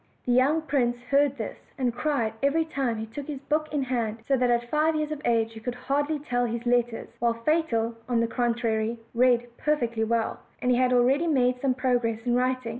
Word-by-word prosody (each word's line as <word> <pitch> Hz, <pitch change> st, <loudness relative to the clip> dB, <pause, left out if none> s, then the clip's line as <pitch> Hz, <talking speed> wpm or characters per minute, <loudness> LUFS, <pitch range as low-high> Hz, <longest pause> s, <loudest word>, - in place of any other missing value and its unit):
The 245 Hz, -, 0 dB
young 275 Hz, +6 st, +3 dB
prince 245 Hz, -5 st, +1 dB
heard 280 Hz, 0 st, +3 dB
this, 220 Hz, -, -5 dB, 0.2 s
and 250 Hz, -3 st, 0 dB
cried 245 Hz, -4 st, -1 dB
every 295 Hz, +4 st, +2 dB
time 270 Hz, -7 st, -2 dB
he 220 Hz, -, -4 dB
took 270 Hz, +6 st, -8 dB
his 290 Hz, -3 st, -5 dB
book 305 Hz, +2 st, -1 dB
in 290 Hz, -2 st, 0 dB
hand 235 Hz, -4 st, -2 dB
so 275 Hz, -, +3 dB
that 250 Hz, -1 st, +1 dB
at 240 Hz, 0 st, +1 dB
five 310 Hz, +1 st, +2 dB
years 305 Hz, 0 st, -1 dB
of 300 Hz, -1 st, -4 dB
age 225 Hz, -1 st, +1 dB
he 220 Hz, -, -9 dB
could 245 Hz, +2 st, -4 dB
hardly 285 Hz, +4 st, -1 dB
tell 250 Hz, -4 st, -1 dB
his 235 Hz, +1 st, -4 dB
letters; 240 Hz, -1 st, 0 dB
while 235 Hz, 0 st, +1 dB
Fatal, 235 Hz, -3 st, 0 dB, 0.2 s
on 240 Hz, -2 st, +2 dB
the 230 Hz, -, +2 dB
contrary, 230 Hz, -1 st, 0 dB, 0.2 s
read 240 Hz, -1 st, +2 dB
perfectly 240 Hz, -7 st, 0 dB
well, 225 Hz, 0 st, 0 dB, 0.2 s
and 250 Hz, 0 st, +2 dB
had 250 Hz, 0 st, +2 dB
already 260 Hz, +6 st, +3 dB
made 250 Hz, -4 st, +2 dB
some 265 Hz, -2 st, +1 dB
progress 245 Hz, -3 st, 0 dB
in 240 Hz, -, +1 dB
writing. 255 Hz, -1 st, 0 dB
250 Hz, 205 wpm, -26 LUFS, 235-280 Hz, 0.2 s, young